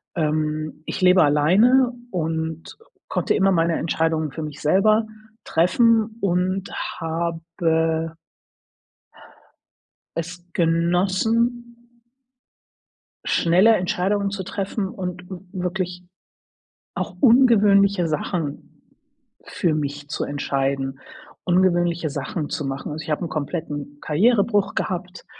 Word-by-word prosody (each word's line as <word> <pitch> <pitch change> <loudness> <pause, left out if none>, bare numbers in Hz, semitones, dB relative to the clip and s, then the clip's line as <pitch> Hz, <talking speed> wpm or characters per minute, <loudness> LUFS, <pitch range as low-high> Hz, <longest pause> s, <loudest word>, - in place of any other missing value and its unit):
Ähm, 155 -1 -2
ich - - -5
lebe 180 -1 +6
alleine 200 - +4 0.2
und 160 -2 -3 0.3
konnte - - 0
immer 195 -1 +3
meine 165 -2 +1
Entscheidungen 160 -2 0
für 160 +4 -6
mich 150 -1 -7
selber 215 +7 +3 0.4
treffen 220 +6 +2
und 185 +1 0 0.3
habe 165 0 -1 2.0
es 165 0 -2 0.2
genossen 190 +8 +1 1.5
schneller 185 +7 +4
Entscheidungen 195 +2 0
zu 195 -1 -5
treffen 195 +1 -3
und 180 -3 -6
w 185 - -5 0.2
wirklich 180 -1 -3 0.9
auch - - -4
ungewöhnliche 205 -7 +5
Sachen 155 -1 -4 0.6
für 170 - -1
mich 145 -1 -4
zu 165 - -2
entscheiden, 135 -1 -2 0.5
ungewöhnliche 175 -2 +2
Sachen 150 +2 -4
zu 145 - -3
machen. 135 +1 -4
Also, 155 +1 -5
ich - - -10
habe 150 +3 -1
'n 170 - -3
kompletten 145 -1 -5
Karrierebruch 205 +4 +2
gehabt, 180 -1 -4
175 Hz, 100 wpm, -22 LUFS, 155-195 Hz, 2.0 s, lebe